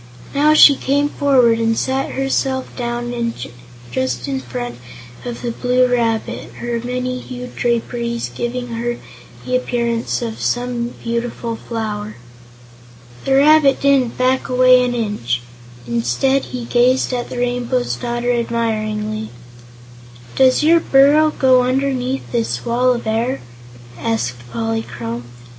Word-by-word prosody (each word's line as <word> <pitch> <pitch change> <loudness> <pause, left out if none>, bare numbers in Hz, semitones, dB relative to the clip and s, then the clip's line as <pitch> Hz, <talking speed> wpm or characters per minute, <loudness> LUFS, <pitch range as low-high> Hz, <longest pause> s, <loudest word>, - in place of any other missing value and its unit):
Now 300 +2 +4
she 285 -2 +9
came 285 +2 +1
forward 250 -6 +3
and 225 0 +1
sat 265 +1 -1
herself 270 -1 -1
down 240 0 -3 0.8
just 125 -1 -2
in 135 -1 -2
front 120 -1 -6 0.4
of 240 0 -6
the 240 - -1
Blue 250 +2 +2
Rabbit, 235 -1 -1
her 240 -1 -3
many 250 +1 -3
hued 250 0 -8
draperies 235 0 -1
giving 245 +1 -3
her 235 +1 -3 0.5
the 255 - 0
appearance 235 -2 -1
of 225 -1 -5
some 245 -1 -2
beautiful 235 0 -3
flower. 215 -2 -5 1.1
The 270 - +3
rabbit 285 0 +5
didn't 275 -4 +2
back 255 +1 +1
away 255 0 +5
an 245 0 -1
inch. 205 - -2 0.4
Instead, 120 - +1
he 250 -2 -6
gazed 250 +2 +2
at 245 -1 -3
the - - -6
Rainbow's 245 0 -1
Daughter 240 0 -2
admiringly. 220 -2 -2 1.1
"Does 260 +2 +4
your 335 +2 +6
burrow 290 +1 +5
go 260 -4 +4
underneath 260 0 -1
this 225 - -1
Wall 250 +2 +2
of 235 - -6
Air?" 230 +4 0 0.6
asked 120 +2 -3
Polychrome. 115 +1 -4
240 Hz, 125 wpm, -18 LUFS, 225-255 Hz, 1.1 s, she